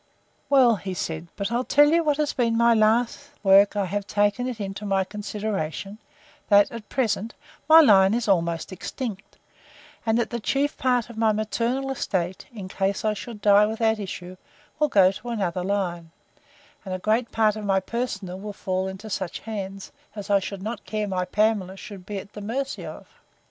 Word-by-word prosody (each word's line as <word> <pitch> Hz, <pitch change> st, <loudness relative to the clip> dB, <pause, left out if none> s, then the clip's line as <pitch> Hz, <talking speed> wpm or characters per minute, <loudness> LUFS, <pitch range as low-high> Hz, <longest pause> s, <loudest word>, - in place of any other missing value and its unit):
Well, 250 Hz, -7 st, +5 dB
said 160 Hz, -2 st, -3 dB
he, 170 Hz, -, -16 dB
but 200 Hz, +2 st, -3 dB
I'll 240 Hz, +2 st, +1 dB
tell 290 Hz, +3 st, +5 dB
you 335 Hz, +1 st, +3 dB
what 295 Hz, -2 st, +1 dB
has 300 Hz, -1 st, 0 dB
been 230 Hz, -2 st, +1 dB
my 235 Hz, 0 st, +5 dB
last 230 Hz, +5 st, +2 dB
work 200 Hz, +1 st, +6 dB
I 200 Hz, -1 st, +1 dB
have 200 Hz, +2 st, -3 dB
taken 205 Hz, +5 st, +1 dB
it 245 Hz, -3 st, -5 dB
into 195 Hz, 0 st, -5 dB
my 195 Hz, -2 st, +1 dB
consideration, 205 Hz, -2 st, -4 dB, 0.5 s
that, 205 Hz, -1 st, +5 dB
at 230 Hz, -2 st, -9 dB
present, 225 Hz, -3 st, -1 dB, 0.3 s
my 320 Hz, +1 st, +10 dB
line 195 Hz, -6 st, +6 dB
is 235 Hz, -2 st, -1 dB
almost 170 Hz, -3 st, 0 dB
extinct; 200 Hz, +1 st, -6 dB, 0.7 s
and 225 Hz, 0 st, +1 dB
that 235 Hz, -, -1 dB
the 235 Hz, -, -2 dB
chief 280 Hz, +6 st, 0 dB
part 245 Hz, -2 st, 0 dB
of 220 Hz, -, -9 dB
my 220 Hz, -1 st, +4 dB
maternal 235 Hz, +5 st, -1 dB
estate, 185 Hz, -8 st, -2 dB
in 205 Hz, -6 st, -8 dB
case 195 Hz, +2 st, -1 dB
I 215 Hz, -, +2 dB
die 210 Hz, -1 st, +3 dB
without 220 Hz, 0 st, 0 dB
issue, 185 Hz, -2 st, -7 dB, 0.4 s
will 300 Hz, -, +3 dB
go 190 Hz, -7 st, +5 dB
to 240 Hz, +5 st, -8 dB
another 185 Hz, -6 st, -2 dB
line, 180 Hz, -4 st, -2 dB, 0.7 s
and 185 Hz, -2 st, -4 dB
great 225 Hz, +3 st, +1 dB
part 215 Hz, -2 st, +2 dB
of 215 Hz, -, -6 dB
my 195 Hz, -1 st, +2 dB
personal 200 Hz, -4 st, -4 dB
will 205 Hz, +1 st, -6 dB
fall 190 Hz, -1 st, -2 dB
into 190 Hz, +3 st, -7 dB
such 190 Hz, -4 st, -4 dB
hands, 195 Hz, -3 st, -6 dB, 0.2 s
as 205 Hz, -1 st, -5 dB
I 200 Hz, -, +5 dB
shall 195 Hz, +1 st, -5 dB
not 215 Hz, +3 st, -5 dB
care 215 Hz, -1 st, -3 dB
my 185 Hz, -2 st, -1 dB
Pamela 195 Hz, -1 st, 0 dB
should 195 Hz, -2 st, -10 dB
be 205 Hz, -, -4 dB
at 195 Hz, +1 st, -9 dB
the 210 Hz, -, -8 dB
mercy 260 Hz, +6 st, -3 dB
of. -, -, -10 dB
210 Hz, 185 wpm, -24 LUFS, 195-230 Hz, 0.7 s, my